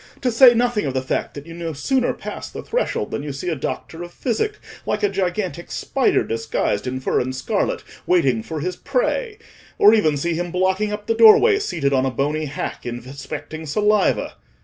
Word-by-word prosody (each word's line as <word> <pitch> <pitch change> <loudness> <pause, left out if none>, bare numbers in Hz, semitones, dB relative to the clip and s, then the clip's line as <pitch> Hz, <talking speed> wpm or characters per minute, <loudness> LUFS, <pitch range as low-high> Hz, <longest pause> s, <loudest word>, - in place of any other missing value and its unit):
—to 250 - 0
say 240 +1 +7
nothing 235 -7 +1
of 135 - -3
the 130 - +1
fact 130 - -2
that 145 0 -8
you 165 - -10
no 165 -1 -5
sooner 250 - +1
pass - - -7
the - - -8
threshold - - -2
than - - -3
you 145 0 -5
see 140 +6 -4
a 165 - 0
doctor 160 +4 -5
of 175 0 -7
physic, 345 - -2 0.3
like 210 0 -2
a 205 - +4
gigantic 185 -3 -2
spider 270 -2 +1
disguised 115 -1 -2
in 130 +1 -2
fur 130 - 0
and 130 +1 -2
scarlet, 130 - -1 0.2
waiting 135 -11 +3
for 155 +6 -5
his 180 +3 -2
prey; - - -1 0.4
or 210 - +7
even 155 -10 +3
see 170 +4 -1
him 175 +2 -2
blocking 190 +4 0
up 210 0 -5
the 225 - +1
doorway 230 - +7
seated 155 - -1
on 130 -1 +3
a - - +1
bony 145 +5 -1
hack, 145 0 -5
inspecting 140 +6 -7
saliva. 210 +7 +1
175 Hz, 195 wpm, -21 LUFS, 140-215 Hz, 0.4 s, say